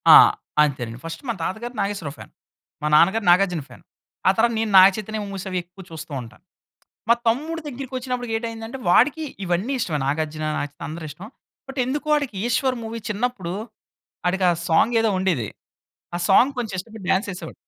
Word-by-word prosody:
ఆహ్, - - +9 0.3
అంతేనండి 125 -5 -1
ఫస్ట్ 165 0 -6
మా - - +2
తాతగారు 235 +7 -4
నాగేశ్వరరావు 190 -8 -3
ఫ్యాన్, - - -12 0.5
మా 150 - 0
నాన్నగారు 195 +7 +4
నాగార్జున 180 -3 +3
ఫ్యాన్, - - -15 0.4
ఆ - - +8
తర్వాత 235 +1 +3
నేను 220 -1 -1
నాగచైతన్య 210 +3 +5
మూవీస్ 195 -1 -6
అవి 185 - -2
ఎక్కువ 180 +2 -14
చూస్తూ 160 0 -8
ఉంటాను. 115 -2 -13 0.7
మా - - +9
తమ్ముడు 310 +8 0
దగ్గరికి 265 -1 -7
వచ్చినప్పుడు 250 -1 -3
ఏటైందంటే 230 +2 -6
వాడికి 285 - +4 0.2
ఇవన్నీ 185 +9 0
ఇష్టమే. 160 -10 -1
నాగార్జున, 155 +1 -2
నాగచైతన 145 0 -5
అందరూ 160 +1 -6
ఇష్టం. 175 +8 -10 0.4
బట్ 270 0 -5
ఎందుకో 290 +4 -3
వాడికి 285 -7 0
'ఈశ్వర్' 255 +2 +1
మూవీ 225 +1 -5
చిన్నప్పుడు, 210 -5 -2 0.7
ఆడికి 185 +1 +1
ఆ - - +2
సాంగ్ 190 +8 +3
ఏదో 225 -1 +2
ఉండేది. 170 - 0 0.7
ఆ - - 0
సాంగ్ 245 +8 +6
కొంచెం 220 -5 -3
ఇష్టపడి 215 0 -9
డాన్స్ 195 +3 +1
వేసేవాడు. 170 -3 -8
200 Hz, 165 wpm, -23 LUFS, 170-240 Hz, 0.7 s, ఆహ్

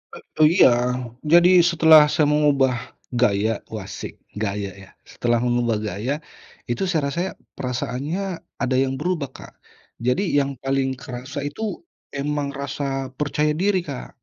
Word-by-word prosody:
Eee, 155 - 0
iya. - - +8 0.5
Jadi 175 +3 +6
setelah 160 -2 +7
saya 150 - +2
mengubah 140 -4 +3 0.4
gaya 110 -3 +1
wasik 105 -4 -7 0.2
gaya 100 -2 -2
ya, 95 - -15 0.2
setelah 120 -1 0
mengubah 120 -2 +1
gaya 105 +8 -2 0.6
itu 120 - -2
saya 165 -4 +1
rasa 170 +5 -2 0.4
perasaannya 130 +7 -3 0.4
ada 130 0 +1
yang 135 0 +1
berubah, 160 -3 -2
Kak. - - -12 0.5
Jadi 125 +11 +1
yang 140 -1 +1
paling 135 0 0
kerasa 130 +1 -7
itu 145 +9 -6 0.5
emang 145 0 -2
rasa 140 -1 -3
percaya 150 +1 +1
diri, 185 +3 +1
Kak. 140 -4 -6
135 Hz, 130 wpm, -22 LUFS, 125-150 Hz, 0.6 s, iya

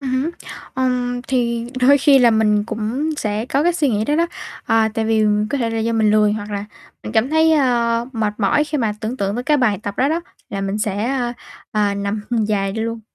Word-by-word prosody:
Ừm 270 -2 -4
hứm. 325 - -2 0.4
Ừm, 250 -1 -1
thì 235 -3 -1
đôi 280 +3 +6
khi 275 -1 +5
là 240 -2 +5
mình 210 -2 +2
cũng 230 +8 -2
sẽ 215 -1 -2
có 275 +3 +1
cái 350 +1 +3
suy 305 -5 +1
nghĩ 215 -2 0
đó 295 - 0
đó. 335 +1 +2 0.4
Ờ, 225 -1 +3
tại 225 - -1
vì 220 -1 +2 0.3
có 285 - -1
thể 230 -3 -1
là 225 - -2
do 225 +1 0
mình 220 -2 +3
lười, 210 -1 +4
hoặc 210 0 -5
là 200 0 -3 0.4
mình - - -6
cảm 230 +5 +2
thấy, 320 0 +4
ơ, 235 -5 +2
mệt 215 -3 -1
mỏi 230 +9 +2
khi 300 0 -3
mà 225 -4 0
tưởng 230 +4 -3
tượng 200 -1 -1
tới 245 - -4
cái 300 +1 +3
bài 230 -7 +1
tập 200 - -4
đó 270 - +2
đó, 325 +3 0 0.3
là 195 - -4
mình 195 +1 -2
sẽ, 210 0 -1
a, 245 -1 -1 0.4
à, 205 -1 +1
nằm 200 +1 -2 0.3
dài 195 -2 0
luôn. 225 +1 -3
230 Hz, 235 wpm, -19 LUFS, 215-260 Hz, 0.4 s, đôi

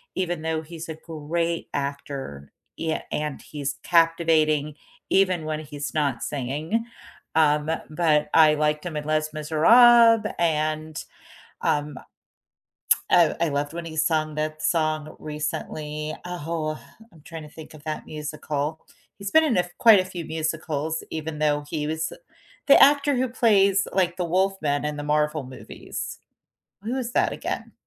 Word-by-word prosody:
even 175 -3 -2
though 160 -1 -1
he's 165 +1 -9
a 160 - -4
great 165 +1 -3
actor, 140 - -5 0.3
yeah, 160 -1 -2
and 150 -2 -3
he's 140 -3 -5
captivating 160 -3 +2 0.3
even 185 -4 +2
when 155 0 -2
he's 145 -1 -6
not 140 -6 0
singing, 150 - -2 0.5
um, 150 -1 +3 0.2
but 155 -2 +1
I 155 -1 +7
liked 150 +1 0
him 170 - -5
in 150 - -3
Les 155 0 0
Misérables 225 +9 +6
and, 155 -2 -1 0.6
um 145 -2 0 1.1
oh, 170 -3 +5
I 170 -2 +1
loved 145 +1 -2
when 170 0 -5
he 160 - -7
sung 155 -1 0
that 155 0 -3
song 155 -2 0
recently, 150 0 -4
oh, 165 -3 -3 0.3
I'm 160 - -19
trying 165 -1 -8
to 150 - -11
think 160 +1 -12
of 150 -2 -14
that 155 -1 -4
musical. 150 0 -4 0.4
He's 200 -1 -5
been 320 0 +6
in 270 -7 +1
a 180 - +4
f 175 - -10
quite 225 -4 +7
a 185 - -5
few 175 -3 -6
musicals, 155 0 -3
even 155 -1 -5
though 150 -1 +1
he 150 -2 -2
was 160 +1 -2 0.5
the 280 - +7
actor 285 0 +5
who 255 0 0
plays 200 -5 +3
like 180 -2 +1
the 180 - -1
wolfman 180 -5 0
in 150 0 -3
the 145 - -5
Marvel 150 0 0
movies. 130 0 -8 0.6
Who 240 +5 -2
is 245 -2 -3
that - - +2
again? - - -5
155 Hz, 150 wpm, -24 LUFS, 150-170 Hz, 1.1 s, I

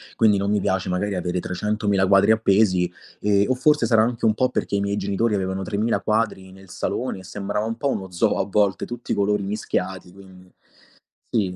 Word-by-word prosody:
Quindi 110 -3 +4
non 100 +1 -1
mi 105 - +2
piace 95 -1 -1
magari 95 +2 -1
avere 90 0 -2
trecentomila 100 +2 0
quadri 100 +2 +5
appesi 100 -4 +3 0.3
ehm, 100 +1 +2
o 130 - +2
forse 150 +4 +3
sarà 110 -2 +4
anche 115 0 -1
un 110 - +4
po' 130 +2 +2
perché 100 - -2
i 100 - +1
miei 100 0 -1
genitori 100 +3 0
avevano 95 0 -2
tremila 110 +4 0
quadri 105 -4 -1
nel 95 0 -16
salone - - -3
e - - -12
sembrava 100 +3 -3
un 115 0 -3
po' 140 - -1
uno 95 -7 -4
zoo 85 - +1
a - - +1
volte, 100 -1 +1
tutti 120 0 -5
i - - -1
colori 105 0 +1
mischiati, 95 -3 -3
quindi 95 -1 -16 0.8
sì, 95 -5 0
100 Hz, 205 wpm, -23 LUFS, 95-110 Hz, 0.8 s, quadri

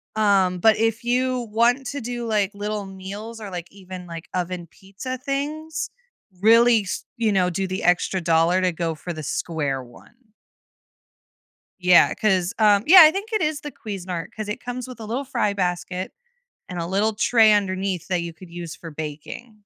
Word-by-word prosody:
Um, 195 -4 +3
but 220 +3 +5
if 225 +1 0
you 250 -1 0
want 245 +4 +2
to 280 +1 -4
do, 240 0 -4
like, 210 -2 +1
little 205 0 -4
meals 200 +4 -8
or, 205 -2 -7
like, 175 -2 -6
even, 185 -2 -10
like, 165 0 -8
oven 180 -1 -3
pizza 210 +7 -7
things, 300 +4 -3 0.5
really 230 +1 +6
s 185 - -5
you 225 -2 +1
know, 185 -2 +2
do 190 +2 -2
the 185 +1 -4
extra 180 +2 +2
dollar 165 +2 +3
to 185 -1 +2
go 165 -1 -2
for 175 +2 -6
the 155 -1 -7
square 145 -3 -2
one. 120 - -17 1.6
Yeah, 180 -1 +5
'cause, 190 -4 +1
um, 210 -1 +4
yeah, 365 +1 +11
I 310 - +9
think 410 +5 -5
it 430 - +1
is 305 -1 -1
the 295 - -7
Cuisinart 185 -5 -6
'cause 215 -1 -5
it 210 - -5
comes 245 0 -5
with 250 -2 -10
a 220 - -7
little 250 +6 -3
fry 235 -6 0
basket 180 -1 -3 0.6
and 180 - -6
a 165 - -2
little 205 +4 +1
tray 220 0 +5
underneath 190 -3 -1
that 180 -2 0
you 170 -1 -5
could 175 +1 -14
use 170 -2 -7
for 165 - -9
baking. 155 +10 -7
200 Hz, 185 wpm, -23 LUFS, 180-235 Hz, 1.6 s, yeah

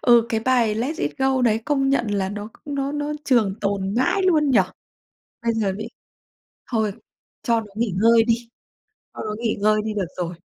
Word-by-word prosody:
Ừ, 240 -2 +5
cái 225 - 0
bài 235 -3 +2
"Let 255 +9 -2
It - - -3
Go" 265 -1 +2
đấy 220 -2 +3
công 275 -2 +1
nhận 270 -4 +2
là 195 -2 0
nó 205 +1 -6 0.2
nó 280 -1 -2
nó 295 0 -2
trường 230 -8 +3
tồn 200 -1 -1
mãi 260 - +2
luôn 310 -6 +3
nhỉ? 250 - +5 0.8
Bây 230 - +1
giờ 210 -3 0
bị - - -5 0.8
thôi 220 -4 +1 0.5
cho 230 -1 +2
nó 215 - -11
nghỉ 220 -3 -1
ngơi 230 0 +6
đi, 230 0 +3 0.8
cho - - -8
nó 215 -1 -3
nghỉ 230 -2 -1
ngơi 215 +1 +3
đi 215 -1 -3
được 200 -4 -1
rồi. 175 -1 -3
230 Hz, 195 wpm, -22 LUFS, 210-265 Hz, 0.8 s, ngơi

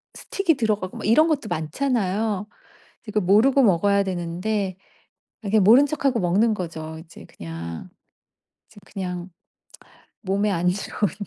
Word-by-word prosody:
스틱이 355 -6 0
들어가고 210 -5 -1
막 - - -6
이런 310 +9 +5
것도 280 -8 -1
많잖아요. 210 - -1 0.6
이게 210 - -9
그 215 - +1
모르고 220 +9 +4
먹어야 200 0 +3
되는데 185 +2 -3 0.7
아 200 - -5
그냥 210 -1 +3
모른 250 +8 +7
척하고 275 -4 0
먹는 205 +6 +2
거죠. 160 -3 -6
이제 165 - -14
그냥. 85 0 -8 0.8
이제 215 - -16
그냥 180 -2 -5 0.9
몸에 200 +1 0
안 180 -2 0
좋은 195 +1 -1
200 Hz, 280 characters per minute, -23 LUFS, 180-225 Hz, 0.9 s, 모른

